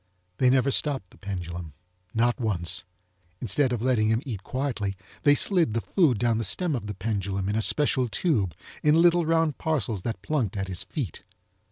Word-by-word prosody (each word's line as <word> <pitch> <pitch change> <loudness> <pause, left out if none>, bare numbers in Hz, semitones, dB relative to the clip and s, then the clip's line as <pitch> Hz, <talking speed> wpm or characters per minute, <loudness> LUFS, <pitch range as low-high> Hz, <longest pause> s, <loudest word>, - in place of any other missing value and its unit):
They 130 - +5
never 130 +1 +3
stopped 135 - 0
the - - -19
pendulum, 85 -5 -5 0.4
not 120 +2 +1
once. 90 -7 +1 0.5
Instead 130 +2 +1
of 120 -2 -2
letting 125 -4 +2
him 110 +4 +1
eat 110 -8 -4
quietly, 110 -7 -2 0.2
they 145 0 +5
slid 170 - +2
the - - +2
food 155 - +2
down 115 0 +1
the - - -1
stem 155 - 0
of 115 -6 -3
the 105 - -5
pendulum 100 -1 -2
in 105 - 0
a 110 - +2
special 130 0 +1
tube, 105 - 0 0.3
in 150 +2 +4
little 170 -1 +4
round 165 -3 +2
parcels 120 - -1
that 115 +3 -4
plunked 125 -10 -1
at 95 0 -2
his 90 -2 -4
feet. 125 - -5
115 Hz, 185 wpm, -26 LUFS, 100-145 Hz, 0.5 s, They